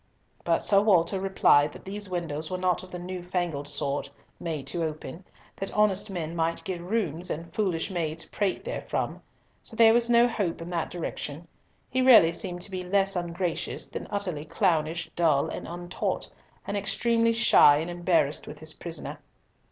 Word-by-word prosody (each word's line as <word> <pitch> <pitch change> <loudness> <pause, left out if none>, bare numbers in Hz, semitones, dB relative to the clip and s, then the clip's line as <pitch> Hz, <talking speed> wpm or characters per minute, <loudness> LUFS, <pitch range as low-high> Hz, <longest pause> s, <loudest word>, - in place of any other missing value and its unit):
But - - +1
Sir 200 -2 +4
Walter 190 -2 +3
replied 150 -6 +4
that - - -13
these 200 +1 -4
windows 160 -4 -3
were 185 - -2
not 180 -1 +1
of 185 - -12
the 180 - -6
new 180 +1 -6
fangled 175 -5 -2
sort, 145 -1 -2 0.3
made 155 -5 -4
to 170 +4 -2
open, 160 +3 -5 0.3
that 195 - -4
honest 210 -1 +2
men 170 -3 -4
might 165 0 -1
get 185 -4 -4
rheums, 180 -3 -2
and 165 +1 -5
foolish 190 -4 -1
maids 165 -2 -2
prate 200 - -2
therefrom. - - -3 0.4
So - - -12
there 225 0 +7
was 235 0 +3
no 235 0 +6
hope 200 -8 -2
in 170 +1 -7
that 170 -2 -1
direction. 165 -2 -5 0.4
He 260 - 0
really 230 -10 +8
seemed 175 +1 -4
to 200 - -6
be 185 -1 -3
less 195 +1 +1
ungracious 175 0 -3
than - - -6
utterly 180 -7 -3
clownish, 165 -1 0
dull, 160 -5 +3
and - - -6
untaught, 175 +1 -3 0.3
and 200 - -3
extremely 230 +3 +2
shy 225 -10 +6
and 165 +3 -3
embarrassed 175 -4 +1
with 150 - -8
his 155 +1 -7
prisoner. 165 -3 -6
175 Hz, 175 wpm, -27 LUFS, 165-195 Hz, 0.4 s, really